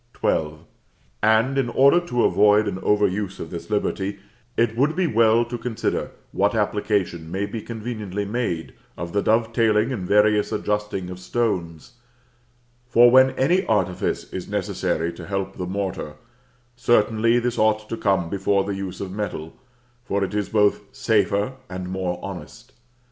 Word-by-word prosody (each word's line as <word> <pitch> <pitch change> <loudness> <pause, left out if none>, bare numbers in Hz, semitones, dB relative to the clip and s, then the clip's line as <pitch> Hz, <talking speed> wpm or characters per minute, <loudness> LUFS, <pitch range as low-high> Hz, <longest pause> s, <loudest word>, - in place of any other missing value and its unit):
XII. 75 -1 0 0.7
And, 110 +6 +3
in 125 -3 0
order 140 +7 +5
to 125 -9 -1
avoid 105 0 +4
an 95 -2 -3
over 105 +1 +2
use 100 0 -2
of - - -7
this 85 -1 -7
liberty, 100 -1 -1 0.4
it 115 -1 +2
would 140 +6 +2
be 185 0 +1
well 115 -4 +3
to 120 0 -6
consider 115 -1 -2 0.2
what 100 +3 +1
application 100 -6 -1
may 95 +2 -1
be 110 +2 -6
conveniently 105 -4 -5
made 100 -7 -3 0.2
of 85 +1 -6
the 100 - +2
dovetailing 115 +1 +2
and 95 -7 -4
various 105 +1 +3
adjusting 105 -3 -2
of 90 - -8
stones; 90 -1 -3 0.9
for 120 0 +6
when 130 +1 +7
any 175 +8 +3
artifice 105 -4 0
is - - -5
necessary 85 +1 -1
to - - -10
help 95 -1 -3
the 90 - -4
mortar, 95 -5 -4 0.6
certainly 115 -1 +3
this 120 0 -1
ought 110 0 +2
to 115 - -3
come 95 -6 +1
before 100 +2 +1
the 100 - -3
use 95 -2 -5
of 95 -2 -5
metal, 95 -6 -5 0.5
for 100 -4 -1
it 95 - -3
is 105 -1 -1
both 105 -2 +3
safer 105 +1 +1 0.2
and 90 0 -5
more 90 -1 -2
honest. 95 -2 -9
105 Hz, 155 wpm, -23 LUFS, 95-115 Hz, 0.9 s, when